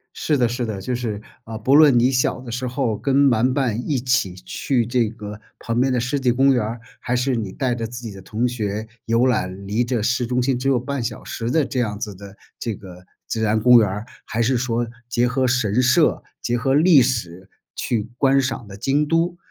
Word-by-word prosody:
是 150 Hz, -, 0 dB
的， 120 Hz, -3 st, +2 dB
是 120 Hz, 0 st, -3 dB
的。 100 Hz, -3 st, -4 dB
就 125 Hz, +6 st, -3 dB
是， 110 Hz, -4 st, -3 dB, 0.2 s
啊， 110 Hz, 0 st, -7 dB
不 130 Hz, +5 st, +2 dB
论 145 Hz, -4 st, +7 dB
你 125 Hz, +2 st, +4 dB
小 130 Hz, 0 st, 0 dB
的 125 Hz, -2 st, -9 dB
时 125 Hz, +2 st, -3 dB
候 125 Hz, -4 st, -1 dB
跟 140 Hz, +4 st, +3 dB
玩 120 Hz, +3 st, +2 dB
伴 125 Hz, -4 st, -1 dB
一 145 Hz, -4 st, +1 dB
起 125 Hz, -7 st, 0 dB
去 120 Hz, +6 st, -1 dB
这 120 Hz, -2 st, +1 dB
个 105 Hz, -2 st, -9 dB, 0.2 s
旁 115 Hz, +1 st, -2 dB
边 130 Hz, 0 st, +2 dB
的 125 Hz, -, +1 dB
湿 125 Hz, +4 st, -1 dB
地 125 Hz, -2 st, +2 dB
公 135 Hz, +2 st, +4 dB
园 125 Hz, -4 st, +1 dB
儿， 115 Hz, +2 st, -4 dB, 0.2 s
还 125 Hz, -, -2 dB
是 125 Hz, +1 st, +1 dB
你 105 Hz, -4 st, -4 dB
带 125 Hz, +2 st, -1 dB
着 115 Hz, -1 st, -3 dB
自 120 Hz, +1 st, -8 dB
己 115 Hz, -, -6 dB
的 95 Hz, -, -10 dB
同 115 Hz, +5 st, -1 dB
学 110 Hz, -2 st, -3 dB, 0.2 s
游 115 Hz, +3 st, +3 dB
览 100 Hz, -5 st, -1 dB
离 110 Hz, +5 st, 0 dB
着 120 Hz, -2 st, -1 dB
市 120 Hz, +2 st, 0 dB
中 125 Hz, +1 st, 0 dB
心 125 Hz, -1 st, 0 dB
只 135 Hz, +2 st, -2 dB
有 130 Hz, -, +3 dB
半 140 Hz, +1 st, -3 dB
小 115 Hz, -1 st, -4 dB
时 115 Hz, 0 st, -4 dB
的 155 Hz, +2 st, +2 dB
这 130 Hz, -1 st, -2 dB
样 105 Hz, -3 st, -2 dB
子 105 Hz, -3 st, -5 dB
的 100 Hz, +1 st, -12 dB, 0.2 s
这 115 Hz, -3 st, -3 dB
个 90 Hz, -2 st, -12 dB, 0.2 s
自 110 Hz, -, -3 dB
然 110 Hz, 0 st, +2 dB
公 125 Hz, +2 st, +7 dB
园 110 Hz, -3 st, +3 dB
儿， 105 Hz, +4 st, -5 dB, 0.2 s
还 115 Hz, +2 st, -2 dB
是 125 Hz, +2 st, +2 dB
说 120 Hz, -1 st, -1 dB, 0.2 s
结 120 Hz, 0 st, +1 dB
合 130 Hz, +1 st, +1 dB
神 125 Hz, -2 st, +1 dB
社、 150 Hz, +6 st, +3 dB, 0.2 s
结 120 Hz, -, 0 dB
合 135 Hz, +3 st, 0 dB
历 160 Hz, -1 st, +6 dB
史 95 Hz, -7 st, -3 dB, 0.3 s
去 115 Hz, -2 st, -2 dB
观 135 Hz, 0 st, +3 dB
赏 125 Hz, -4 st, -3 dB
的 100 Hz, -, -10 dB
京 135 Hz, +7 st, +1 dB
都， 170 Hz, +2 st, +1 dB
120 Hz, 250 characters per minute, -21 LUFS, 110-130 Hz, 0.3 s, 论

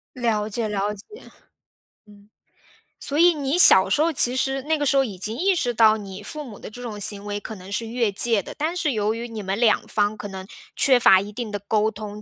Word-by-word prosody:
了 220 Hz, -4 st, -1 dB
解， 220 Hz, +1 st, -2 dB
了 205 Hz, 0 st, -2 dB
解。 200 Hz, -, -13 dB, 0.2 s
嗯。 -, -, -16 dB, 1.7 s
所 290 Hz, -, -2 dB
以 345 Hz, +1 st, +5 dB
你 290 Hz, +2 st, -2 dB
小 190 Hz, -, +7 dB
时 290 Hz, -, +1 dB
候 330 Hz, +1 st, +2 dB
其 250 Hz, -3 st, +3 dB
实 270 Hz, +1 st, -1 dB
那 315 Hz, +2 st, 0 dB
个 290 Hz, -, -2 dB
时 280 Hz, 0 st, +2 dB
候 270 Hz, -, +3 dB
已 200 Hz, -5 st, -7 dB
经 215 Hz, +5 st, -5 dB
意 380 Hz, +3 st, +1 dB
识 245 Hz, -7 st, -1 dB
到 220 Hz, -1 st, +5 dB
你 195 Hz, -3 st, -8 dB
父 305 Hz, -1 st, -7 dB
母 225 Hz, -7 st, -11 dB
的 -, -, -9 dB
这 245 Hz, +3 st, -11 dB
种 220 Hz, -4 st, -7 dB
行 200 Hz, 0 st, 0 dB
为 205 Hz, 0 st, -4 dB
可 220 Hz, +1 st, -8 dB
能 190 Hz, +1 st, -12 dB
是 225 Hz, +2 st, -3 dB
越 230 Hz, -2 st, -1 dB
界 215 Hz, -1 st, +1 dB
的， -, -, -9 dB
但 315 Hz, +4 st, -2 dB
是 330 Hz, -5 st, 0 dB
由 215 Hz, -2 st, -1 dB
于 235 Hz, +1 st, -6 dB
你 220 Hz, -2 st, -6 dB
们 195 Hz, +1 st, -3 dB
两 230 Hz, -2 st, +3 dB
方 210 Hz, 0 st, -1 dB
可 205 Hz, -, -7 dB
能 190 Hz, -1 st, -8 dB, 0.3 s
缺 260 Hz, -3 st, +4 dB
乏 190 Hz, -4 st, +6 dB
一 205 Hz, +1 st, -8 dB
定 230 Hz, 0 st, -6 dB
的 205 Hz, -1 st, -4 dB
沟 215 Hz, +2 st, 0 dB
通， 210 Hz, -1 st, -9 dB
220 Hz, 260 characters per minute, -22 LUFS, 205-260 Hz, 1.7 s, 小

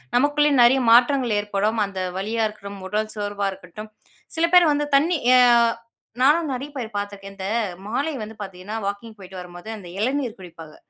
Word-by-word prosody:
நமக்குள்ளே 290 Hz, +3 st, +3 dB
நெறைய 245 Hz, +3 st, +5 dB
மாற்றங்கள் 245 Hz, -1 st, +4 dB
ஏற்படும். 205 Hz, +2 st, -1 dB
அந்த 195 Hz, -1 st, -7 dB, 0.2 s
வலியா 220 Hz, +4 st, -1 dB
இருக்கட்டும், 200 Hz, -1 st, -10 dB
உடல் 215 Hz, +2 st, -2 dB
சோர்வா 205 Hz, -1 st, -2 dB
இருக்கட்டும். 190 Hz, +3 st, -11 dB, 0.5 s
சில 330 Hz, +1 st, +2 dB
பேர் 345 Hz, -4 st, +7 dB
வந்து 295 Hz, 0 st, -1 dB
தண்ணி 325 Hz, +5 st, +3 dB, 0.2 s
ஆ -, -, +6 dB, 0.8 s
நானும் 300 Hz, +3 st, +3 dB
நெறைய 270 Hz, +3 st, -5 dB
பேர் 230 Hz, -5 st, -6 dB
பார்த்துருக்கேன். 200 Hz, -1 st, -6 dB
இந்த 190 Hz, 0 st, -5 dB, 0.4 s
மாலை 280 Hz, +8 st, -1 dB
வந்து 220 Hz, +1 st, -9 dB
பார்த்தீங்கன்னா, 190 Hz, +1 st, -7 dB
வாக்கிங் 210 Hz, +3 st, -5 dB
போய்ட்டு 190 Hz, -1 st, -11 dB
வரும்போது, 175 Hz, +3 st, -10 dB
அந்த 185 Hz, -4 st, -11 dB
இளநீர் 250 Hz, -1 st, -1 dB
குடிப்பாங்க. 165 Hz, -4 st, -12 dB
215 Hz, 160 wpm, -22 LUFS, 195-265 Hz, 0.8 s, பேர்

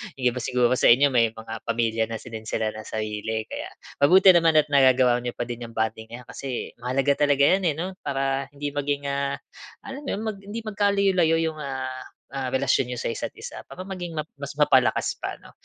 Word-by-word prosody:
Hindi 125 Hz, -2 st, +1 dB
ba 125 Hz, -, -5 dB
siguro 125 Hz, 0 st, +1 dB
sa -, -, +5 dB
inyo 135 Hz, +4 st, +6 dB
may 115 Hz, -2 st, +2 dB
mga 110 Hz, 0 st, -8 dB
pamilya 115 Hz, -1 st, +1 dB
na 115 Hz, -, -5 dB
si 115 Hz, +2 st, -9 dB
din 110 Hz, -1 st, -7 dB
sila 110 Hz, -1 st, -1 dB
ng 110 Hz, 0 st, -9 dB
sarili. 110 Hz, +1 st, -3 dB
Kaya, -, -, -6 dB, 0.3 s
mabuti 185 Hz, +6 st, +7 dB
naman 165 Hz, -2 st, +4 dB
at 150 Hz, -1 st, +4 dB
nagagawa 130 Hz, -3 st, +5 dB
n'yo 120 Hz, 0 st, -5 dB
pa -, -, -2 dB
din 120 Hz, 0 st, -6 dB
'yong 115 Hz, -, -15 dB
bonding 110 Hz, 0 st, -2 dB
na 125 Hz, +2 st, -9 dB
'yan -, -, -26 dB
kasi 130 Hz, -1 st, -5 dB
mahalaga 130 Hz, +3 st, +1 dB
talaga 140 Hz, -1 st, +3 dB
'yan 190 Hz, +4 st, +3 dB
eh 150 Hz, -, +1 dB
'no, 175 Hz, +5 st, -3 dB
para 135 Hz, 0 st, -1 dB
hindi 145 Hz, 0 st, -3 dB
maging, 145 Hz, 0 st, -2 dB
ah, 140 Hz, 0 st, -1 dB, 0.5 s
alam 270 Hz, +2 st, -7 dB
mo -, -, -2 dB
yun, 210 Hz, -, -5 dB
mag 215 Hz, -3 st, -3 dB
hindi 205 Hz, +3 st, -6 dB
magkalayo-layo 200 Hz, -5 st, +2 dB, 0.2 s
yung, 155 Hz, -, -12 dB
ah, 130 Hz, -2 st, -5 dB, 0.3 s
ah, 135 Hz, -1 st, -3 dB
relasyon 135 Hz, -1 st, +2 dB
niyo 125 Hz, -, -4 dB
sa -, -, -2 dB
isa't -, -, -4 dB
isa, -, -, -8 dB
para 185 Hz, -, -8 dB
maging 180 Hz, -4 st, -6 dB
map 155 Hz, 0 st, -3 dB
mas 140 Hz, 0 st, -6 dB
mapalakas 135 Hz, -4 st, +3 dB
pa -, -, -4 dB
ano. -, -, -17 dB
135 Hz, 220 wpm, -25 LUFS, 120-155 Hz, 0.5 s, mabuti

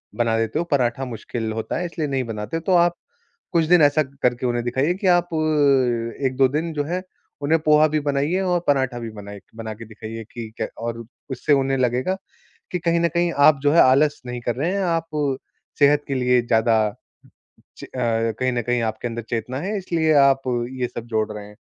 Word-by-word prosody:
बना 115 Hz, -1 st, +1 dB
देते 115 Hz, +7 st, -1 dB
हो, 170 Hz, -, -1 dB
पराठा 130 Hz, -1 st, +1 dB
मुश्किल 115 Hz, -1 st, -5 dB
होता 110 Hz, 0 st, -3 dB
है 180 Hz, -, -2 dB
इसलिए 165 Hz, -3 st, -3 dB
नहीं 135 Hz, -2 st, -1 dB
बनाते 110 Hz, +5 st, -4 dB
हो।" -, -, -5 dB
तो 190 Hz, -, +2 dB
आप 175 Hz, 0 st, +1 dB, 0.6 s
कुछ 170 Hz, -2 st, +3 dB
दिन 175 Hz, -1 st, +5 dB
ऐसा 145 Hz, +1 st, +4 dB, 0.2 s
करके 125 Hz, 0 st, +1 dB
उन्हें 120 Hz, -1 st, -1 dB
दिखाइए 130 Hz, +8 st, +1 dB
कि -, -, 0 dB
आप 175 Hz, 0 st, -1 dB, 1.0 s
1-2 130 Hz, 0 st, +3 dB
दिन 160 Hz, +4 st, -2 dB
जो 145 Hz, -1 st, -2 dB
है, 180 Hz, +4 st, -3 dB, 0.4 s
उन्हें 155 Hz, +3 st, +2 dB
पोहा 155 Hz, 0 st, +6 dB
भी 155 Hz, 0 st, 0 dB
बनाइए 145 Hz, +6 st, +1 dB
और 180 Hz, -2 st, +1 dB
पराठा 130 Hz, -3 st, +1 dB
भी 115 Hz, -1 st, -6 dB
बनाइ 100 Hz, 0 st, -9 dB
बना 110 Hz, -1 st, -6 dB
के 115 Hz, +2 st, -10 dB
दिखाइए 110 Hz, +1 st, -8 dB
कि 115 Hz, -2 st, -6 dB
क्य -, -, -1 dB
और 115 Hz, 0 st, -4 dB, 0.3 s
उससे 130 Hz, +3 st, 0 dB
उन्हें 135 Hz, -1 st, +2 dB
लगेगा 125 Hz, +8 st, 0 dB, 0.6 s
कि 180 Hz, -, 0 dB
कहीं 170 Hz, 0 st, +1 dB
न 170 Hz, -, +3 dB
कहीं 170 Hz, 0 st, 0 dB, 0.2 s
आप 140 Hz, -3 st, +3 dB
जो 145 Hz, 0 st, +3 dB
है, 170 Hz, -, +6 dB
आलस 145 Hz, +3 st, +3 dB
नहीं 125 Hz, 0 st, -5 dB
कर 120 Hz, 0 st, -2 dB
रहे 160 Hz, +8 st, -1 dB
हैं, 200 Hz, 0 st, -1 dB
आप 155 Hz, -5 st, -1 dB, 0.4 s
सेहत 145 Hz, +1 st, +4 dB
के 135 Hz, -, -1 dB
लिए 125 Hz, -1 st, +2 dB
ज़्यादा 115 Hz, -1 st, +2 dB, 1.0 s
च -, -, -8 dB
अ, -, -, -11 dB
कहीं 115 Hz, +1 st, 0 dB
न 120 Hz, -1 st, -1 dB
कहीं 120 Hz, +1 st, 0 dB
आपके 110 Hz, +2 st, -2 dB
अंदर 115 Hz, 0 st, -5 dB
चेतना 120 Hz, +3 st, -3 dB
है, 200 Hz, +5 st, -2 dB
इसलिए 165 Hz, -4 st, +1 dB
आप 135 Hz, -1 st, +4 dB, 0.4 s
ये 125 Hz, -, +1 dB
सब 120 Hz, -, -7 dB
जोड़ 110 Hz, -1 st, -1 dB
रहे 105 Hz, -1 st, -8 dB
हैं। 105 Hz, -, -16 dB
130 Hz, 205 wpm, -22 LUFS, 115-155 Hz, 1.0 s, पोहा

